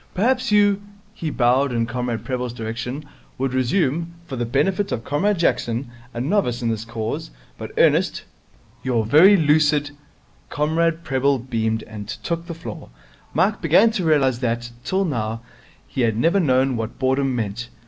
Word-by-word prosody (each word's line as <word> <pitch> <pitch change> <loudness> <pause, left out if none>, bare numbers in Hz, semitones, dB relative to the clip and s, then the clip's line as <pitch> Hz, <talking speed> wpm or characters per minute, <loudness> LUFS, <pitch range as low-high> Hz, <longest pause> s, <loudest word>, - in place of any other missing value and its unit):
Perhaps 250 +4 +1
you' 205 -1 +4 0.3
he 165 -7 -4
bowed 130 +1 +2
in 115 -1 0
Comrade 120 -1 -3
Prebble's 125 -2 -3
direction 120 +5 -5 0.3
'would 135 0 -1
resume, 160 +5 0
for 140 - -6
the 120 -2 -2
benefit 195 - 0
of 115 - -2
Comrade 195 - +1
Jackson 120 -6 0 0.2
a 120 - -6
novice 125 - 0
in 115 - +1
the 110 0 -2
Cause, 110 - -4 0.3
but - - -8
earnest - - +3 0.6
your 120 -4 0
very 175 - +7
lucid 150 -2 +3 0.3
' - - -34
Comrade 165 +2 +1
Prebble 135 +1 +1
beamed, 110 -3 -2
and 105 -2 -9
took 170 +8 -4
the 170 - -5
floor. 165 - -8 0.5
Mike 205 +2 +2
began 185 +8 +5
to 200 -4 -2
realize 140 -6 +2
that, 120 -1 -2
till 195 +1 0
now, 115 -7 -2 0.5
he 130 - -3
had 115 -2 +1
never 170 - +3
known 130 -5 +2
what 115 -1 -4
boredom 130 0 +1
meant. 115 +1 -3
135 Hz, 160 wpm, -22 LUFS, 120-165 Hz, 0.6 s, very